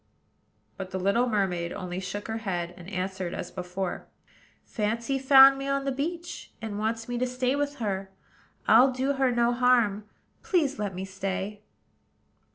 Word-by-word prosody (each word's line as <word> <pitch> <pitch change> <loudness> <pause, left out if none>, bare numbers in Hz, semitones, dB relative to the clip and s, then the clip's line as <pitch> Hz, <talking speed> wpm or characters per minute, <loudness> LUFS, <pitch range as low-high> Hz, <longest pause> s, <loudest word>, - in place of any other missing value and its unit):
But 190 -1 -6
the 190 - -4
little 200 +7 +2
mermaid 180 -5 0
only 180 -1 -5
shook 190 +2 -5
her 220 0 -3
head, 175 -5 -3
and 180 +1 -11
answered 190 -2 -3
as 175 - -6
before, 180 0 -4 0.6
"Fancy 235 +5 -1
found 270 0 +8
me 275 - -4
on 275 0 0
the 275 - 0
beach, 335 +6 -4
and 215 -2 -5
wants 225 +1 -2
me 245 0 -3
to 255 - +1
stay 250 +1 0
with 290 0 -1
her. 195 -6 -3 0.6
I'll 260 +2 +7
do 260 +2 0
her 270 -2 +2
no 240 0 +2
harm: 240 -5 +3 0.4
please, 295 -7 +1
let 200 -3 -3
me 190 +1 -4
stay." 195 +2 -4
220 Hz, 165 wpm, -27 LUFS, 190-260 Hz, 0.6 s, found